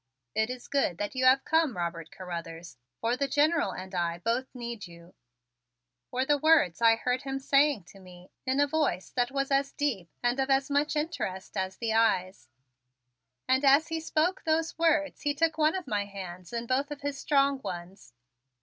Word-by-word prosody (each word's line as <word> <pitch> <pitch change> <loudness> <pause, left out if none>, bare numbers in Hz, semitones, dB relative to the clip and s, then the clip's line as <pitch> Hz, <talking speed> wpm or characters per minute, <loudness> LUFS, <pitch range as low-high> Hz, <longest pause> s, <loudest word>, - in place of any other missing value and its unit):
"It 220 +1 +1
is 250 -1 -7
good 275 -11 0
that 205 +1 -3
you 260 -1 0
have 265 +1 +5
come, 320 - +2
Robert 170 -2 -4
Carruthers, 170 -4 -7 0.2
for 230 +2 0
the 280 +2 -1
General 295 - +2
and 185 +1 -8
I 170 -1 -1
both 230 +8 -1
need 235 -5 -6
you," 170 0 -15 1.0
were 255 +1 -1
the 290 0 +2
words 295 - +4
I 225 -1 +6
heard 250 +3 -1
him 270 -1 -4
saying 275 - +3
to 195 - -15
me 180 -1 -15
in 260 +1 0
a 285 - +5
voice 285 -10 -1
that 245 -1 0
was 275 0 -2
as 275 0 +2
deep 230 - -2
and 245 +2 +1
of 270 0 0
as 270 +1 +2
much 290 +2 +1
interest 295 - -3
as 190 0 -2
the 230 -2 -1
eyes, 185 - +1 1.0
and 260 +2 +3
as 280 +4 +5
he 325 0 -2
spoke 320 +3 0
those 320 0 0
words 310 -3 +2
he 290 -1 0
took 320 +1 +1
one 310 +3 +3
of 370 -2 -4
my 205 -2 -1
hands 185 -3 -9
in 235 0 -3
both 265 +4 0
of 295 -1 -7
his 285 -1 -3
strong 275 -2 +2
ones. 175 - -8
255 Hz, 190 wpm, -29 LUFS, 190-285 Hz, 1.0 s, I